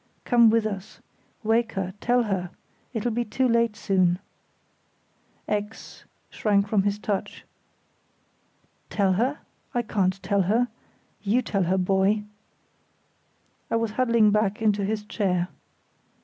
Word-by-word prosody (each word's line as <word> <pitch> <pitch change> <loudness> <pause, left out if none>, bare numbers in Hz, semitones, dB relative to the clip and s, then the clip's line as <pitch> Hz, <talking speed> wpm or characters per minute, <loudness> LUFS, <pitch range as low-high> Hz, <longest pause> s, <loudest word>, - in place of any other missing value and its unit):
Come 235 -2 +6
with 225 0 +2
us. 200 -2 -5 0.4
Wake 225 +1 +1
her, 190 -1 -3
tell 245 0 +3
her. 190 -5 -2 0.4
It'll 240 0 -1
be 240 +2 0
too 255 +3 0
late 230 -2 +2
soon." 185 -4 +2 1.3
X—— 210 +1 -4 0.3
shrank 205 -1 +1
from 200 -1 +2
his 200 +1 0
touch. 210 -2 -4 1.4
"Tell 195 -3 +2
her? 250 +10 0 0.4
I 240 - +1
can't 195 -4 0
tell 200 +1 +2
her. 225 +7 +2 0.5
You 225 +5 +1
tell 195 -3 0
her, 185 +3 +1
boy." 195 +3 +2 1.5
He - - 0
was 230 -1 0
huddling 230 -2 +3
back 210 -1 +1
into 210 -2 +2
his 210 +1 -2
chair. 185 -4 -1
210 Hz, 125 wpm, -25 LUFS, 195-230 Hz, 1.5 s, Come